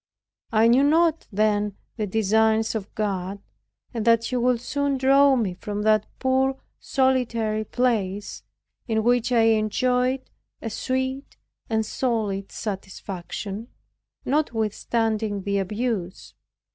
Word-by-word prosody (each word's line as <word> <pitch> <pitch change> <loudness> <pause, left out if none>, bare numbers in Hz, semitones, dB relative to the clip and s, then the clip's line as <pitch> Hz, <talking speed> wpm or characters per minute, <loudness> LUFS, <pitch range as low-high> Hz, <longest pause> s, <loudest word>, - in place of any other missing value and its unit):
I 225 0 +4
knew 245 +3 +5
not 320 +3 +3
then 210 0 +1 0.2
the 215 -3 -2
designs 220 +2 +2
of 210 -3 -5
God, 195 -2 -2 0.6
and 230 -3 -2
that 230 0 +4
He 255 - -2
would 245 -1 +2
soon 285 +2 -1
draw 275 +1 +5
me 215 -7 0
from 205 +3 -5
that 215 -1 +3
poor 265 0 +1 0.2
solitary 235 -5 +1
place, 210 -5 -1 0.5
in 220 -2 +1
which 245 +1 +2
I 235 -2 +4
enjoyed 250 +4 +2 0.3
a 225 - -5
sweet 260 +4 -3 0.3
and 220 -1 +1
solid 210 -5 -2
satisfaction, 195 +1 -6 0.6
notwithstanding 225 -5 0
the 200 0 0
abuse. 205 -2 -3
225 Hz, 115 wpm, -24 LUFS, 210-255 Hz, 0.6 s, knew